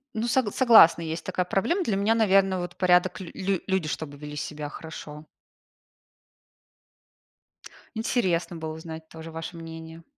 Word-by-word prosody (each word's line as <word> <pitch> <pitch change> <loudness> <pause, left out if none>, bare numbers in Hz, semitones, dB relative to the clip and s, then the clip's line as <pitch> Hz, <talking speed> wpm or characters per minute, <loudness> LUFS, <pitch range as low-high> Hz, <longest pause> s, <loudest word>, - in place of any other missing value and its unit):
Ну, 220 +2 -1
сог 240 -4 +1
согласна, 220 -10 +7
есть 160 0 -5
такая 185 -1 -1
проблема. 330 - 0
Для 220 - 0
меня, 210 +3 +2
наверно, 195 -4 +3
вот 175 0 -5
порядок, 180 0 +3
лю 185 -3 -8
лю 195 -1 -1
люди 190 -5 0
чтобы 145 -1 -5
вели 150 0 -8
себя 150 0 -5
хорошо. 150 -1 -9 2.7
Интересно 190 -7 0
было 160 -1 -5
узнать 160 0 -9
тоже 160 0 -10
ваше 165 +2 -7
мнение. 165 0 -9
175 Hz, 140 wpm, -26 LUFS, 160-195 Hz, 2.7 s, согласна